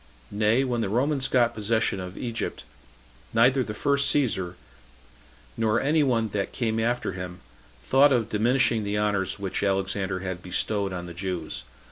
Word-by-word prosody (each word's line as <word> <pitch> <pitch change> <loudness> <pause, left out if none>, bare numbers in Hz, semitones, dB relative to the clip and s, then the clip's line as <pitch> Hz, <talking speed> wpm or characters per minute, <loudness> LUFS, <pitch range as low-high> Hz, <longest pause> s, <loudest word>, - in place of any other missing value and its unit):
Nay, 110 +5 +2
when 120 -3 -1
the 105 - -1
Romans 135 +5 +1
got 120 -2 +3
possession 110 -2 0
of 90 0 -7
Egypt, 115 -2 -4 0.7
neither 125 +4 +5
the 105 -4 -4
first 140 +4 +2
Caesar, 95 -11 0 1.0
nor 110 0 +2
any 155 +2 +2
one 115 -6 +1
that 100 -1 -2
came 115 -3 -1
after 120 0 0
him, 90 -1 -7 0.4
thought 140 - +5
of 120 -4 +2
diminishing 120 +1 +2
the 100 0 -1
honors 105 -2 0
which 100 -2 -3
Alexander 95 -1 -1
had 95 -2 -4
bestowed 100 +2 -1
on 90 -1 -5
the 85 - -8
Jews. 85 -8 -4
110 Hz, 155 wpm, -26 LUFS, 95-120 Hz, 1.0 s, neither